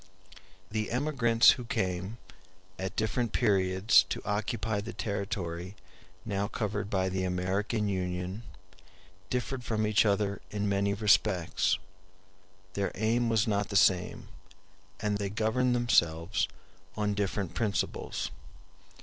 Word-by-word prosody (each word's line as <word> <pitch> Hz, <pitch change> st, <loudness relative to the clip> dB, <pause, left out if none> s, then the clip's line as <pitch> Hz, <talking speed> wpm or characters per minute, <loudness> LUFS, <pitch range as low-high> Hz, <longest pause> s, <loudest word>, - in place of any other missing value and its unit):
The 110 Hz, 0 st, -1 dB
emigrants 120 Hz, -3 st, +4 dB
who 125 Hz, -, -3 dB
came, 95 Hz, 0 st, -2 dB, 0.6 s
at 95 Hz, 0 st, -4 dB
different 110 Hz, +1 st, -1 dB
periods 95 Hz, +1 st, +4 dB
to -, -, -2 dB
occupy 110 Hz, 0 st, -1 dB
the 115 Hz, +3 st, -7 dB
territory 95 Hz, -3 st, -4 dB, 0.5 s
now 100 Hz, -2 st, -1 dB
covered 105 Hz, -1 st, -3 dB
by 95 Hz, -2 st, +1 dB
the 95 Hz, 0 st, -1 dB
American 95 Hz, +4 st, -1 dB
Union 90 Hz, +1 st, -2 dB, 0.9 s
differed 125 Hz, +1 st, -2 dB
from 110 Hz, -2 st, 0 dB
each 105 Hz, -1 st, +4 dB
other 100 Hz, -1 st, 0 dB
in 105 Hz, 0 st, -2 dB
many 100 Hz, 0 st, +1 dB
respects; 95 Hz, -7 st, +2 dB, 1.0 s
their 100 Hz, -1 st, -1 dB
aim 115 Hz, +2 st, +1 dB
was 110 Hz, -2 st, +3 dB
not 105 Hz, -2 st, 0 dB
the 100 Hz, -, -4 dB
same, 90 Hz, -2 st, +2 dB, 0.7 s
and 105 Hz, -1 st, 0 dB
they 100 Hz, -1 st, -1 dB
governed 115 Hz, +4 st, +1 dB
themselves 85 Hz, -6 st, +2 dB, 0.5 s
on 105 Hz, -1 st, 0 dB
different 100 Hz, -2 st, -2 dB
principles. 105 Hz, -4 st, -2 dB
105 Hz, 115 wpm, -30 LUFS, 95-110 Hz, 1.0 s, emigrants